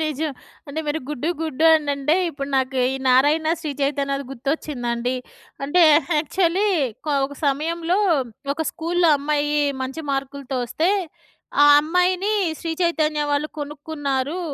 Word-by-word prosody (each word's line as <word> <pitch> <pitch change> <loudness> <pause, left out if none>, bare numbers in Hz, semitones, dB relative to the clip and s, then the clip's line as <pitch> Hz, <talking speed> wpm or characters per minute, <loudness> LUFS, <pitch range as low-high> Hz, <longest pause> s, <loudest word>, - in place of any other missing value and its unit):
నిజం. 310 0 -2 0.4
అంటే 295 +3 -3
మీరు 295 +2 -1
గుడ్డు 300 +1 -3
గుడ్డు 315 -1 -1
అనంటే 285 -1 +1 0.2
ఇప్పుడు 275 -3 -6
నాకు 265 0 0 0.2
ఈ - - -3
నారాయణ 290 +5 +4
శ్రీ 310 - -4
చైతన్యది 275 0 -1
గుర్తొచ్చిందండి. 250 -3 -2 0.5
అంటే 345 +6 +3 0.4
యాక్చువల్లీ 360 +6 +1 0.4
కో 300 - 0
ఒక 285 - -11
సమయంలో 330 +6 0 0.5
ఒక 320 +3 -3
స్కూల్‌లో 340 +1 +1
అమ్మాయి 295 +1 0 0.3
మంచి 265 +5 -5
మార్కులతో 275 -1 -3
వస్తే 315 +8 0 0.7
ఆ - - +8 0.2
అమ్మాయిని 360 +5 +1 0.3
శ్రీ 330 - -4
చైతన్య 310 -3 +1
వాళ్ళు 290 +1 0
కొనుక్కున్నారు 290 0 -3
295 Hz, 125 wpm, -22 LUFS, 275-320 Hz, 0.7 s, ఆ